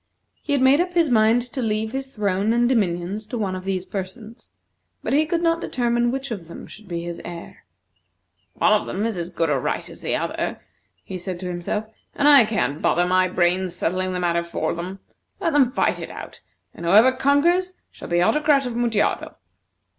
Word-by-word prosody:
He - - -2
had 275 -2 +2
made 275 +5 +5
up 360 0 -3
his 335 -5 +2
mind 225 +1 +4
to 250 +2 -5
leave 220 -1 -1
his 270 +1 -5
throne 205 +1 +1
and 240 0 +3
dominions 200 -3 -1
to 240 - -4
one 195 -4 -2
of 185 0 -7
these 190 -1 -2
persons, 210 +4 -7 0.5
but - - -1
he 305 +2 +3
could 335 +2 -1
not 330 0 +2
determine 240 -3 0
which 270 +1 -4
of 185 -7 -5
them 170 - -9
should 215 -1 -13
be 170 -1 -4
his 170 0 -6
heir. 170 -1 -9 0.9
"One 210 -1 +1
has 230 -2 -1
as 170 -1 -4
good 165 -3 -1
a 140 - +1
right - - -2
as - - -12
the - - -1
other," - - -3 0.4
he 185 - -6
said 175 0 -5
to 180 - -4
himself, 180 +5 -3 0.3
"and 290 - +2
I 280 -5 +8
can't 200 -9 -1
bother 175 - +2
my 185 +1 +3
brains 180 0 0
settling 185 +2 -1
the 180 - -2
matter 170 -1 +1
for 170 - -2
them. 185 +3 -6 0.4
Let 330 - 0
them 275 -4 +4
fight 255 - 0
it - - -6
out, - - -10 0.3
and - - -10
whoever 215 +8 +7
conquers 330 +8 +2 0.2
shall - - -10
be 175 0 +2
Autocrat 295 +4 +3
of 245 - -3
Mutjado." 230 -3 0
215 Hz, 200 wpm, -23 LUFS, 180-260 Hz, 0.9 s, I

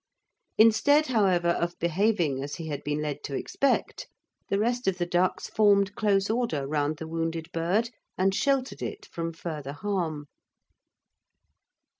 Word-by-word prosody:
Instead, 230 +8 +5
however, 190 - +2
of 170 0 -1
behaving 170 -5 +1
as 145 +1 -5
he 165 -2 -6
had 145 - -4
been 150 +1 -2
led 145 -1 -4
to 140 - -4
expect, 275 - -1 0.4
the 195 - +1
rest 240 +3 0
of 190 -2 +1
the 175 - 0
ducks 180 +1 0
formed 200 -2 +3
close 200 -2 +1
order 220 - -1
round 150 +1 -1
the 160 - -7
wounded 165 0 -3
bird 190 +8 0 0.3
and 190 +1 +2
sheltered 270 +3 0
it - - -5
from 165 0 -4
further 155 -4 -6
harm. 165 -4 -2
175 Hz, 145 wpm, -27 LUFS, 155-210 Hz, 0.4 s, Instead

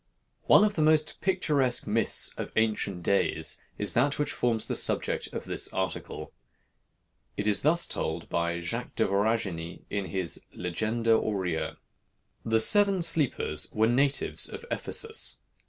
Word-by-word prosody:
One - - +6
of 210 -1 +1
the 160 - -2
most 155 0 +2
picturesque 150 -10 +1
myths 115 +2 +1
of - - -6
ancient 105 -5 -1
days 100 +2 0 0.2
is - - +1
that 135 +4 +1
which 150 0 -1
forms 115 -2 -1
the - - -3
subject - - +1
of - - -6
this - - -1
article. 95 -3 -5 1.0
It 105 - -2
is 105 - +4
thus 170 +4 +3
told 80 +1 -5
by 85 0 -2
Jacques 115 +8 -5
de 110 - +1
Voragine, 100 -5 -2
in 100 -1 -2
his 95 -3 -2
"Legenda 110 +6 -2
Aurea:" 95 -7 -2 0.7
"The 110 0 +1
seven 200 - +5
sleepers 155 -5 +1
were 110 - +3
natives 135 +4 +1
of - - -9
Ephesus. 450 0 +1
110 Hz, 140 wpm, -27 LUFS, 95-145 Hz, 1.0 s, One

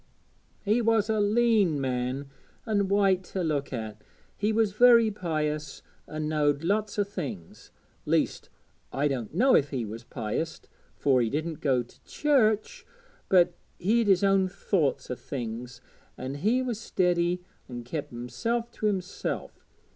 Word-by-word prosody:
'He 215 +4 +3
was 225 -1 +2
a 215 - +1
leän 210 -5 +3
man 130 +1 -2 0.4
and 205 -4 +1
white 195 -2 +3
to 185 0 -3
look 145 -4 -1
at. 110 -4 -6 0.3
He 210 +1 0
was 220 -2 +2
very 230 0 +6
pious, 155 -6 -3 0.2
and 155 0 -4
knowed 150 -1 +1
lots 210 +4 0
o' 205 - +3
things. 150 - -7 0.4
Least, - - 0 0.4
I 145 +2 +1
don't 125 -6 -3
know 255 +7 +5
if 140 - +3
he 130 -5 -2
was 110 +3 -7
pious, 120 +9 -3 0.4
fur 135 -3 +3
he 115 - +1
didn't 155 +4 -3
go 130 -4 +2
to 120 - -22
church, 280 - +1 0.5
but 180 -2 +5 0.2
he'd 220 +5 +2
his 195 0 +4
own 195 -1 +4
thoughts 170 -8 -1
o' - - -1
things, 120 -1 -6 0.4
an' 130 +2 -5
he 215 - +1
was 240 -4 -3
steady, 180 -4 +1 0.3
an' 120 -1 -6
kep' 145 +5 -5
himself 230 - -3
to 215 - -2
himself. 190 -2 -3
175 Hz, 145 wpm, -27 LUFS, 135-210 Hz, 0.5 s, very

